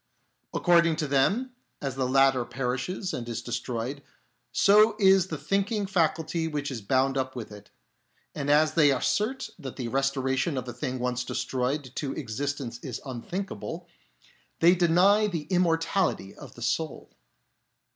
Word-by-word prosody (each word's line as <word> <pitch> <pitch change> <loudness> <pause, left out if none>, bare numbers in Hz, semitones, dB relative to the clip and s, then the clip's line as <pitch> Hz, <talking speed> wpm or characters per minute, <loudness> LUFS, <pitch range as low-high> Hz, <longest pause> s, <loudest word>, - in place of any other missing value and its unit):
According 170 -2 +3
to 155 - -2
them, 200 - +1 0.3
as 135 -3 -3
the 130 -1 -1
latter 135 -1 +4
perishes 130 - -3
and 120 -1 -5
is 115 0 -4
destroyed, 125 +3 -4 0.5
so 210 +2 +5
is 190 -3 +5
the - - -4
thinking 200 +1 0
faculty 165 -3 0
which 145 -2 -3
is 120 -4 -5
bound 135 +5 +1
up 130 0 -3
with 115 -4 -6
it; 105 -1 -12 0.6
and 145 -1 -3
as 155 +1 +4
they 155 -3 +5
assert 210 - 0
that 135 -5 -7
the 120 -3 -4
restoration 135 +2 0
of 130 -1 -4
a 120 - -5
thing 130 +1 -4
once 125 0 -1
destroyed 130 +2 -2
to 140 -3 -2
existence 135 0 -4
is 125 -3 -6
unthinkable, 135 - -5 0.7
they 170 +2 +6
deny 185 +4 +4
the 170 -7 -3
immortality 165 - +1
of 135 -3 -12
the 120 - -8
soul. 155 +5 -2
140 Hz, 145 wpm, -27 LUFS, 125-175 Hz, 0.7 s, they